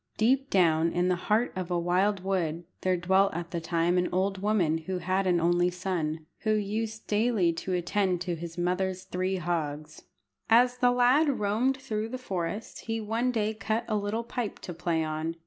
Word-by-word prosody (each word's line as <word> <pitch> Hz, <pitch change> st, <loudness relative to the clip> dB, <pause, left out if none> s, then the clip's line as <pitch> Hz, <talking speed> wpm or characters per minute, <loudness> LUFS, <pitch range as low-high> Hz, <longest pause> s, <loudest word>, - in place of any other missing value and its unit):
Deep 265 Hz, +5 st, +2 dB
down 165 Hz, -3 st, +3 dB
in 175 Hz, +1 st, +1 dB
the 180 Hz, -, +3 dB
heart 220 Hz, +4 st, +2 dB
of 185 Hz, -1 st, -4 dB
a 175 Hz, -, +1 dB
wild 185 Hz, +3 st, +1 dB
wood 175 Hz, -4 st, -1 dB, 0.2 s
there 185 Hz, -1 st, +1 dB
dwelt 190 Hz, +3 st, +3 dB
at 170 Hz, 0 st, -5 dB
that 170 Hz, -2 st, -3 dB
time 170 Hz, +1 st, +2 dB
an 180 Hz, -, 0 dB
old 190 Hz, +1 st, 0 dB
woman 185 Hz, -7 st, +2 dB
who 185 Hz, +3 st, -4 dB
had 185 Hz, +2 st, 0 dB
an 175 Hz, -1 st, +3 dB
only 175 Hz, +1 st, +3 dB
son, 165 Hz, -4 st, -3 dB
who 215 Hz, -, +1 dB
used 215 Hz, +1 st, -2 dB
daily 210 Hz, -5 st, +2 dB
to 170 Hz, +3 st, -5 dB
attend 180 Hz, +1 st, 0 dB
to 180 Hz, 0 st, -2 dB
his 165 Hz, 0 st, -8 dB
mother's 185 Hz, +1 st, -1 dB
three 185 Hz, 0 st, -2 dB
hogs. 155 Hz, -3 st, -3 dB, 0.4 s
As 245 Hz, +2 st, +5 dB
the 245 Hz, 0 st, +4 dB
lad 250 Hz, +5 st, +4 dB
roamed 220 Hz, +6 st, +1 dB
through 220 Hz, -4 st, -3 dB
the 255 Hz, -, -4 dB
forest, 200 Hz, -3 st, -4 dB
he 225 Hz, 0 st, -2 dB
one 225 Hz, +3 st, -1 dB
day 220 Hz, -2 st, 0 dB
cut 220 Hz, +2 st, -2 dB
a 215 Hz, -, 0 dB
little 210 Hz, +3 st, -1 dB
pipe 235 Hz, -1 st, -4 dB
to 175 Hz, -, -6 dB
play 170 Hz, -1 st, -1 dB
on. 155 Hz, +1 st, -3 dB
185 Hz, 190 wpm, -28 LUFS, 175-215 Hz, 0.4 s, As